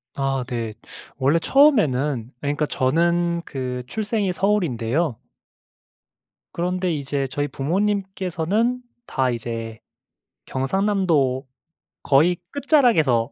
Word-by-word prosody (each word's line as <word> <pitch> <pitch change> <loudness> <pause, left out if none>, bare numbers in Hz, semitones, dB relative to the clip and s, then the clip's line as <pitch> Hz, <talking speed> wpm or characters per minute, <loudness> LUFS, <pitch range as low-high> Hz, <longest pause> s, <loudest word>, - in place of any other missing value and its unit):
아. 135 -2 -1
네. 115 -3 -3 0.4
원래 140 +5 +3
처음에는 150 - +3
그러니까 145 +1 0
저는 170 +5 +1
그 125 -2 -4
출생이 210 - -1
서울인데요. 160 - 0 1.3
그런데 180 +1 -1
이제 140 -1 -2
저희 145 +3 -2
부모님께서는 195 - -1 0.2
다 130 -2 0
이제 115 -1 -4 0.7
경상남도 150 -4 +1 0.6
거의 165 +6 +4
끝자락에서. 230 - +3
150 Hz, 225 characters per minute, -22 LUFS, 130-190 Hz, 1.3 s, 거의